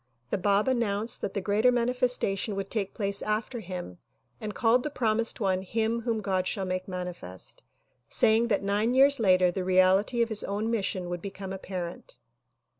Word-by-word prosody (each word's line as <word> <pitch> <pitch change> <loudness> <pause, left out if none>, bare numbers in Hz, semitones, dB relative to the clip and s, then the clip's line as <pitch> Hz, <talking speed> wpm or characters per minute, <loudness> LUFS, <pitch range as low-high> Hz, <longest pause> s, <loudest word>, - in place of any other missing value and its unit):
The - - +1
Bab 200 +3 +2
announced 230 -3 0
that 195 - -4
the 200 - 0
greater 210 +5 +3
manifestation 245 -4 0
would 195 0 -4
take 205 -4 -2
place 200 -2 -1
after 215 +3 -2
him 180 - -7 0.4
and 210 -1 -5
called 235 +2 +3
the 300 - -3
promised 230 -4 0
one 190 -3 +1
"Him 225 +4 -1
whom 230 -2 -2
God 185 -2 0
would 185 -1 -3
mani 180 -1 -4
fest," 90 - -8 0.5
saying 225 +2 +3
that 205 -3 0
nine 210 +5 +1
years 275 +1 +6
later 185 -4 +4
the 185 +1 -3
reality 185 +6 +3
of 230 - -3
his 220 -2 0
own 210 +3 -2
mission 195 -5 -1
would 175 -1 -4
become 195 -1 -6
apparent. 185 - -6
205 Hz, 175 wpm, -28 LUFS, 185-230 Hz, 0.5 s, years